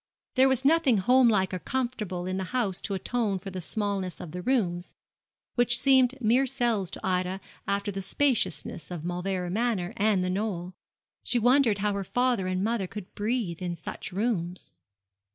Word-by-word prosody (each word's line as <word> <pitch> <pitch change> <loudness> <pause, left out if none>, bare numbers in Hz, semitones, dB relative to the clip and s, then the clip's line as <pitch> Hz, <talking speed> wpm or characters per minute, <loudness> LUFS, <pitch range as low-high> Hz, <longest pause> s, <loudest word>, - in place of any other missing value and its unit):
There 265 +1 +5
was 265 0 +1
nothing 295 -6 +4
home 250 +6 +5
like 190 -5 +2
or 185 - -2
comfortable 215 -7 -3
in 185 0 -2
the 190 - -2
house 205 -7 0
to 200 - -2
atone 215 0 -1
for 195 +1 -8
the 185 0 -5
smallness 195 -1 -2
of 160 - -7
the 180 +2 -5
rooms, 180 -7 0 0.6
which 240 -1 +3
seemed 265 0 +4
mere 250 +3 +3
cells 235 -7 0
to - - -6
Ida 185 0 0 0.3
after 200 +1 0
the 195 0 -4
spaciousness 215 - 0
of 175 -4 -6
Mauleverer 180 0 -2
Manor 210 -4 0
and 205 -3 +2
The 180 - 0
Knoll. 185 -3 -2 0.5
She 245 - 0
wondered 245 -2 +4
how 205 +1 0
her 200 0 -2
father 245 -2 +1
and 185 +1 -1
mother 220 -3 0
could 200 -1 -9
breathe 210 -5 -2
in 175 -1 -2
such 165 - -7
rooms. 185 -3 -2
200 Hz, 175 wpm, -28 LUFS, 185-245 Hz, 0.6 s, There